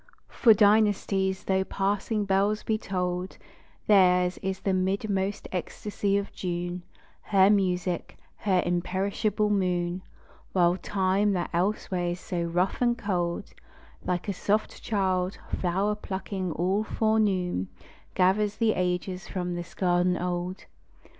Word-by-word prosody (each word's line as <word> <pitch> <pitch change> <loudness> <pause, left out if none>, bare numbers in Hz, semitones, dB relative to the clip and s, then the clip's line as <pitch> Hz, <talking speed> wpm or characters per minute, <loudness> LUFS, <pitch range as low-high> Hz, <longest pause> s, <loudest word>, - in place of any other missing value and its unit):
For 225 -4 +5
dynasties 200 -2 +3
tho' 190 0 +1
passing 205 +2 -1
bells 200 +2 +1
be 220 - 0
tolled, 180 -2 -3 0.5
Theirs 180 -3 +4
is 190 0 -3
the 195 - 0
midmost 195 +1 -1
ecstasy 200 +2 -2
of 200 0 -3
June, 175 0 -3 0.4
Her 195 -1 +4
music, 180 -3 0 0.2
her 185 -3 +1
imperishable 195 +4 0
moon; 180 -2 0 0.5
While 175 -1 +3
Time, 195 +2 +1
that 175 -2 -2
elsewhere 180 0 0
is 175 +1 -2
so 175 -1 -3
rough 175 +5 0
and 240 -1 +2
cold, 180 -6 -2 0.5
Like 180 +1 -2
a 200 - 0
soft 210 +3 -1
child, 190 -3 0 0.2
flower 190 +4 +1
plucking 190 -2 -4
all 190 +6 0
forenoon, 200 - +1 0.5
Gathers 200 +3 +2
the 225 -2 +2
ages 180 0 -2
from 180 -2 -3
this 175 0 -7
garden 180 -1 +2
old. 180 +1 -3
190 Hz, 120 wpm, -27 LUFS, 180-205 Hz, 0.5 s, For